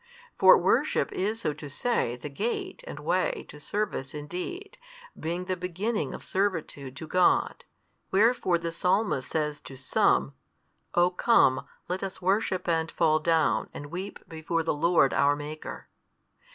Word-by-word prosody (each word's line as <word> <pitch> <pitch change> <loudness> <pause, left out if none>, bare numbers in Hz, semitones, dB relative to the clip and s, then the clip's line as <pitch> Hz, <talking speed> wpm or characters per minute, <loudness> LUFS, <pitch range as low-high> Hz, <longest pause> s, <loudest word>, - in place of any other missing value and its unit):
For - - +8
worship - - +1
is 215 +4 -2
so 150 - 0
to 150 -1 -9
say 145 - 0
the 125 +4 -7
gate 370 - -3
and - - -7
way - - 0
to 150 - -11
service 150 -5 -3
in 145 0 -5
deed, 360 - -6 0.4
being 170 +3 -3
the 185 0 -1
beginning 185 +5 -2
of - - -10
servitude 165 -9 -2
to 160 - -7
God. 185 - +2 0.4
Wherefore 200 -3 +3
the 170 0 -4
Psalmist 180 -5 0
says 150 -2 -1
to 135 - -11
some, 70 - +2 0.6
O 175 +1 +4
come, 180 - +3 0.2
let 180 +2 -2
us 195 -1 -5
worship 190 0 0
and 165 -1 +1
fall 155 -2 +2
down, 160 0 +2
and 145 0 -8
weep 190 +3 -7
before 165 +1 -2
the 160 - 0
Lord 165 -2 +3
our 145 0 +3
Maker. 150 +1 -7
170 Hz, 150 wpm, -28 LUFS, 150-195 Hz, 0.6 s, For